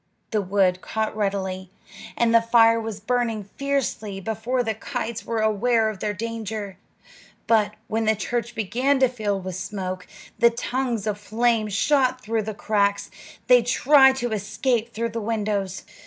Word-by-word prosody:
The 215 -2 +1
wood 185 -1 +1
caught 220 -1 -2
readily, 190 -3 -2 0.5
and 230 -1 +2
the 230 - +6
fire 230 0 +4
was 220 -2 -5
burning 230 -1 -1
fiercely 225 -4 -3
before 225 +5 -1
the 220 -1 -1
kites 235 0 -5
were 230 -1 -1
aware 220 +1 +2
of 205 - -11
their 210 - -1
danger; 215 -2 -5 0.7
but 215 -2 +2
when 225 +1 -1
the 220 0 +3
church 235 +2 -3
began 250 +6 +1
to 260 - +6
fill 215 -5 -2
with 185 0 -6
smoke, 185 -1 -5 0.3
and 235 0 +4
tongues 245 -4 -2
of 210 -1 -2
flame 225 +1 +1
shot 255 +5 +2
through 225 -2 -1
the 215 0 -5
cracks, 200 -1 0 0.3
they 250 -1 +6
tried 265 +3 +5
to 245 -3 -3
escape 220 +3 -1
through 230 +1 -2
the 230 0 -4
windows. 205 -3 -2
220 Hz, 155 wpm, -24 LUFS, 205-235 Hz, 0.7 s, the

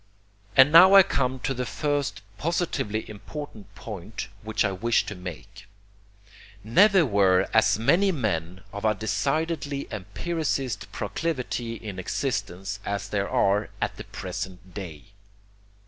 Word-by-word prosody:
And 130 +2 +8
now 185 +4 +9
I 195 - +10
come 130 -7 -1
to 135 - -1
the 125 0 -3
first 140 -10 -2 0.2
positively 155 - -1
important 110 +2 -9
point 105 -1 -7
which 110 -1 0
I 100 - +1
wish 115 +5 +1
to 105 - -5
make. 90 - -10 1.0
Never 185 - +5
were 95 -5 +3
as 110 - +4
many 175 - +3
men 95 - -2
of 100 - -6
a 110 -1 +2
decidedly 145 - -1
empiricist 130 - -3
proclivity 125 -7 -3
in 105 -4 -7
existence 100 -2 -3
as 100 0 -3
there 100 -1 -1
are 100 +2 +2
at - - -2
the - - -8
present 95 -1 -7
day. 85 -7 -7
110 Hz, 130 wpm, -26 LUFS, 100-145 Hz, 1.0 s, I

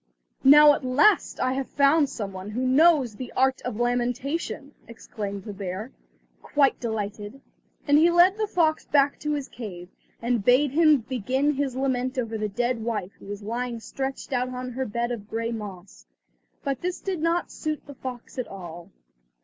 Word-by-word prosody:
"Now 295 +2 +9
at 285 - -4
last 275 +12 +3
I 255 0 +1
have 270 0 -3
found 285 +1 +3
some 200 -4 -5
one 190 +2 -7
who 245 +5 -2
knows 275 -4 +4
the 250 +2 -7
art 265 0 +2
of 250 -3 -4
lamentation," 245 +5 -2
exclaimed 205 -3 -6
the 210 - -7
bear, 195 +5 -5 0.5
quite 280 -2 +2
delighted; 215 +1 -4 0.5
and 290 +1 +6
he 335 +2 +5
led 350 +3 +5
the 430 0 -1
fox 325 -5 +1
back 285 0 +2
to 300 0 -2
his 285 -2 -3
cave, 180 -7 -8 0.3
and 235 -2 0
bade 255 +5 +4
him 305 -2 +5
begin 260 +5 0
his 275 -2 -2
lament 260 -1 -1
over 230 -3 -2
the 215 -1 -2
dead 240 +2 -1
wife 215 -5 -3
who - - -13
was 205 +1 -6
lying 235 +2 -3
stretched 270 +4 -5
out 250 0 0
on 255 0 -5
her 260 +2 -3
bed 235 +3 -2
of 215 -3 -6
grey 230 +1 -2
moss. 205 -4 -8 0.6
But 275 -4 -2
this 360 0 -3
did 375 -5 -3
not 335 +2 0
suit 310 -1 -4
the 285 - -10
fox 255 -1 -8
at 250 - -3
all. 175 -2 -9
255 Hz, 180 wpm, -25 LUFS, 220-285 Hz, 0.6 s, Now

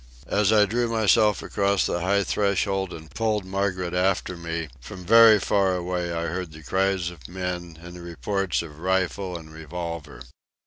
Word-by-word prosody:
As 105 0 +3
I 105 -1 +6
drew 120 +4 0
myself 110 -1 +3
across 100 0 +1
the 85 - -1
high 100 +3 +2
threshold 95 -1 0
and 80 -2 -10
pulled 110 -1 0
Margaret 95 -2 -2
after 90 0 +1
me, 85 -2 -4
from 90 +9 -10
very 115 +1 +8
far 95 -1 +2
away 90 -1 -2
I 85 0 -2
heard 85 0 -4
the 80 0 -12
cries 95 -1 0
of 75 -8 -12
men 90 -2 -5
and 85 +1 -10
the 90 - -9
reports 85 +3 -2
of 75 -2 -11
rifle 95 0 -1
and 80 -1 -12
revolver. 80 -3 -6
90 Hz, 170 wpm, -25 LUFS, 85-100 Hz, -, very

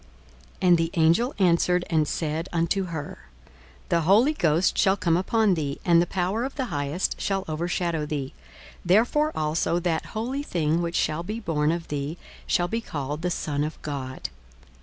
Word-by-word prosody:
42:001:035 - - +4
And 175 - +7
the 165 0 0
angel 170 +10 +3
answered 180 -1 +3
and 155 -3 +1
said 160 +3 -2
unto 170 +3 0
her, 160 -4 -7 0.6
The 170 - +2
Holy 215 - +4
Ghost 170 - +2
shall 190 +1 +3
come 170 -4 +2
upon 205 +3 +2
thee, 145 -5 -2
and 170 -1 +5
the 175 - 0
power 190 +6 -1
of 270 - -4
the 265 - -1
Highest 145 +5 -2
shall 195 -1 -1
overshadow 165 0 -1
thee: 140 -3 -4 0.5
therefore 240 - +3
also 155 +2 0
that 165 -2 -1
holy 255 +6 -2
thing 165 - 0
which 170 0 -3
shall 155 +2 0
be 210 +6 -4
born 155 -7 0
of 170 0 -4
thee 145 +3 -3 0.3
shall 175 - +2
be 230 +4 -2
called 150 -5 -4
the 180 - 0
Son 145 -4 -2
of 155 +1 -5
God. 135 -3 -5
170 Hz, 175 wpm, -25 LUFS, 155-190 Hz, 0.6 s, And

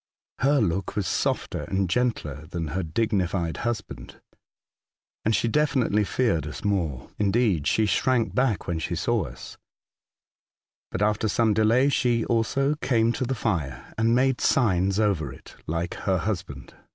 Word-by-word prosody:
Her 140 +2 +3
look 95 -1 -1
was 105 -3 -1
softer - - -1
and 95 0 0
gentler 80 - -1
than 85 -2 -4
her 95 +6 -2
dignified 90 -1 -1
husband, 100 - -5 1.0
and 110 +1 +2
she 115 - +1
evidently 130 -8 +2
feared 100 -7 0
us 75 - -7
more 85 -11 -1
— - - -35
indeed, 100 -6 +2
she 110 - +3
shrank 115 +4 +1
back 125 -8 +1
when 85 -2 -2
she 80 - -3
saw - - 0
us; - - -11 1.3
but 105 - -2
after 105 +1 +1
some 110 0 +2
delay 115 +6 +3
she 120 -4 +1
also 135 +5 +1
came 115 -3 +2
to 130 - -2
the 130 +2 -1
fire 85 - -3
and 115 +1 +2
made 130 0 +2
signs 100 -5 +2
over 95 - +1
it 65 - -14
like 85 +2 -2
her 95 -2 0
husband. 90 -7 -4
105 Hz, 150 wpm, -25 LUFS, 85-120 Hz, 1.3 s, Her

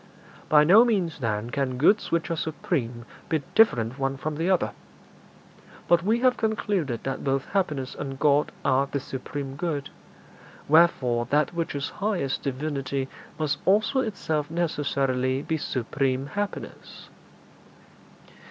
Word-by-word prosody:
By 150 -1 +7
no 195 +9 +7
means, 190 -10 0
then, 115 -1 -2
can 130 -2 -1
goods 200 - +3
which 170 0 0
are - - +1
supreme 140 - -3 0.2
be 155 -3 0
different 130 - +3
one 135 0 -1
from 150 +2 -4
the 165 +3 0
other. 185 -2 +2 1.2
But 175 -1 +4
we 220 +6 +1
have 255 -1 +3
concluded 200 - -1
that 135 -1 -3
both 135 -1 0
happiness 150 -10 -1
and 135 -1 -6
God 145 +1 +3
are 135 +2 +3
the 140 - -2
supreme 135 +1 -6
good; 145 -2 -3 0.8
wherefore 135 -7 +4
that 150 +5 +1
which 165 -3 -3
is 140 0 -3
highest 190 -10 -1
Divinity 135 -1 -3 0.3
must 150 -2 -1
also 215 +7 +3
itself 160 - -2
necessarily 140 -5 0
be 160 - -1
supreme 130 0 -1
happiness.' 205 +7 -6
145 Hz, 135 wpm, -26 LUFS, 135-170 Hz, 1.2 s, By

